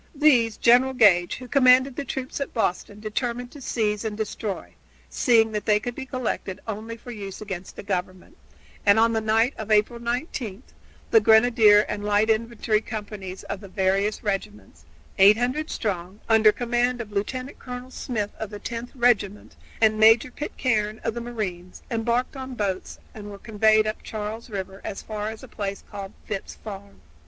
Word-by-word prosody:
These 250 -7 +4
General 250 +3 +5
Gage, 190 -8 +4
who 255 - -9
commanded 255 0 +5
the 285 - -3
troops 265 0 -5
at 280 - -4
Boston, 205 -1 -1
determined 240 +3 -3
to 290 - -12
seize 210 -4 -1
and 215 -2 -3
destroy, 215 -2 -4 0.4
seeing 225 -4 +3
that 210 -2 -4
they 210 -1 +4
could 245 +3 -4
be 265 +1 -7
collected 250 -7 -3
only 220 +2 -5
for 245 +2 -10
use 200 -4 -7
against 190 -3 -7
the - - -8
Government, 185 - -4 0.5
and 200 +1 +5
on 230 +1 +4
the 220 - +1
night 225 +4 +2
of 220 0 -6
April 215 +3 +2
19 235 - -4 0.5
the 445 - +7
grenadier 220 - +6
and 205 -1 -4
light 210 +2 +3
infantry 220 -1 0
companies 205 -4 -7
of 200 - -5
the 200 - -11
various 195 +2 0
regiments, 205 0 -4 0.3
800 245 +10 +4
strong, 190 -2 -3
under 220 -1 +6
command 245 +1 0
of 220 -3 -6
Lieutenant 255 +7 -4
Colonel 250 0 -8
Smith 215 -6 -3
of 220 - -4
the 205 - -7
Tenth 235 +3 -5
Regiment, 225 -5 +1 0.2
and 215 -1 +3
Major 225 +3 +6
Pitcairne 220 -7 -1
of 225 - -1
the 235 - -5
Marines, 195 -7 -5
embarked 235 +3 0
in 260 -1 -6
boats 195 -4 -3 0.2
and 205 -1 -9
were 200 - -8
conveyed 215 +1 +3
up 215 0 -3
Charles 220 +2 -6
River 195 -1 -6
as 195 - -6
far 215 -1 -4
as 220 0 -9
a - - -9
place 200 -2 -5
called 200 -1 -7
Phipps' 195 -3 -5
Farm. 200 -2 -10
220 Hz, 170 wpm, -25 LUFS, 205-240 Hz, 0.5 s, the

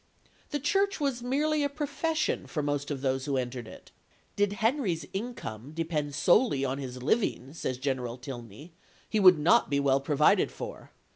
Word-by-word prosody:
The 290 - -2
Church 390 +7 +1
was 275 -5 -1
merely 295 +5 +1
a 285 - +1
profession 305 +2 -1
for 150 - -3
most 145 0 -1
of 140 -3 -3
those 130 -1 0
who 140 -2 0
entered 125 -2 -3
it. - - -13 0.4
"Did 205 0 +1
Henry's 210 - 0
income 155 - -6
depend 155 -3 -2
solely 175 - +3
on 135 +1 -2
his 125 -2 -6
living," 145 - 0
says 130 -6 -3
General 130 -3 -2
Tilney, 125 - -9 0.4
"he 215 - 0
would 185 -3 +8
not 175 +11 +4
be 140 -1 +1
well 140 -1 +2
provided 150 +1 +3
for. - - -8
150 Hz, 165 wpm, -29 LUFS, -, 0.4 s, would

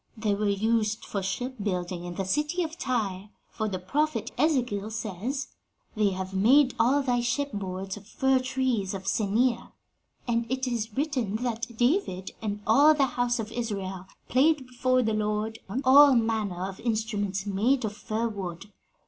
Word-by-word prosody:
They 215 -2 0
were 205 +1 0
used 215 +1 0
for 200 - -3
shipbuilding 190 -4 -3
in 175 0 -6
the 195 - -2
city 300 - 0
of 320 0 -5
Tyre; 210 - -2 0.2
for 220 - -2
the 190 - -2
prophet 255 +6 -1
Ezekiel 245 -8 +1
says, 225 +5 -4 0.5
'They 210 -2 +3
have 190 0 -5
made 255 +8 +5
all 270 +5 +3
thy 245 -2 +1
ship 280 +4 -1
boards 190 -1 -4
of 205 0 -13
fir 265 +3 +2
trees 255 -6 -1
of 190 0 -7
Senir,' 230 +5 +1 0.6
and 235 -1 0
it 260 0 0
is 225 -2 -3
written 265 -8 -1
that 240 +1 -2
'David 240 - +1
and 210 -1 -3
all 285 +8 +6
the 280 -2 +3
house 245 0 +1
of 225 -1 -4
Israel 195 -6 -4 0.2
played 275 +2 +3
before 255 0 +1
the 220 -1 0
Lord 215 +1 -1
on 250 +8 -2
all 275 +1 +8
manner 215 -6 0
of 195 -1 -8
instruments 210 -4 -1
made 225 +6 +1
of 210 -1 -4
firwood.' 210 -5 -4
225 Hz, 160 wpm, -27 LUFS, 200-255 Hz, 0.6 s, all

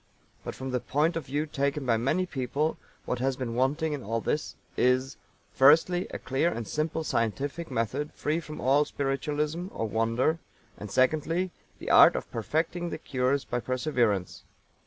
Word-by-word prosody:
But - - -6
from 130 0 -5
the 125 - 0
point 150 +7 +1
of 165 -4 -4
view 145 +4 -1
taken 140 -1 -1
by 120 -2 +3
many 135 +11 +1
people 145 0 -2 0.3
what 125 - -2
has 135 +1 0
been 125 -3 -3
wanting 145 +6 +1
in 145 - -4
all 115 +2 -2 0.5
is, 130 +2 +2 0.4
firstly, 160 +7 +5
a - - -5
clear 135 +6 0
and 115 -2 -5
simple 155 +4 -1
scientific 140 +7 -2
method 130 +7 -2
free 155 +2 -1
from 155 -2 -8
all 135 +3 +4
spiritualism 150 +5 -2
or 110 - -3
wonder, 115 +9 +1 0.4
and, 105 - -8
secondly, 155 - +1 0.3
the - - -4
art - - +8
of - - -4
Perfecting 165 +9 -1
the - - -4
cures 135 -2 0
by 120 - -2
Perseverance. 120 - 0
140 Hz, 160 wpm, -28 LUFS, 125-155 Hz, 0.5 s, art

